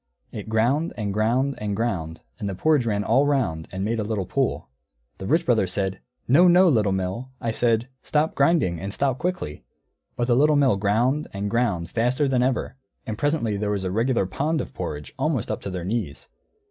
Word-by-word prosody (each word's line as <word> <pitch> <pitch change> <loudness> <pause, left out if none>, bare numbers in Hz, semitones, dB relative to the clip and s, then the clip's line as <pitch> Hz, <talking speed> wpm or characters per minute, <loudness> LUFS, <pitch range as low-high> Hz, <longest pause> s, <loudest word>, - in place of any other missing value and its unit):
It 105 0 -7
ground, 125 +9 +1
and 105 -3 -2
ground, 120 +6 +1
and 105 -1 -2
ground, 90 -8 -2 0.2
and 100 - -3
the 95 - -4
porridge 145 +3 +2
ran 105 -2 0
all 140 +6 +3
round 110 - 0
and 95 +1 -3
made 115 +1 -1
a - - 0
little 105 -3 -2
pool. - - -1 0.5
The 95 - -5
Rich 165 +3 +2
Brother 110 -6 +2
said, 95 +1 -2 0.3
"No, 165 +9 +6
no, 180 +2 +6
Little 110 -8 +2
Mill, 95 +7 -3
I 115 - -1
said, 115 +1 +1
'Stop 155 +1 0
grinding, 140 - +2
and 95 +3 -5
stop 130 +2 -1
quickly.'" 175 - -3 0.5
But 120 - 0
the 120 -1 +2
Little 150 +4 +4
Mill 135 -8 +3
ground, 120 +9 +1
and 100 +1 -3
ground, 100 -8 0
faster 125 +5 +1
than 130 -2 +2
ever; 130 0 -1 0.3
and 110 - -3
presently 130 -6 0
there 105 0 -2
was 100 -2 -1
a 95 - -2
regular 115 +1 +1
pond 150 - -1
of - - -5
porridge, 75 - -6
almost - - 0
up - - -3
to - - -5
their 90 -2 -5
knees. 100 -8 -4
115 Hz, 200 wpm, -24 LUFS, 100-135 Hz, 0.5 s, No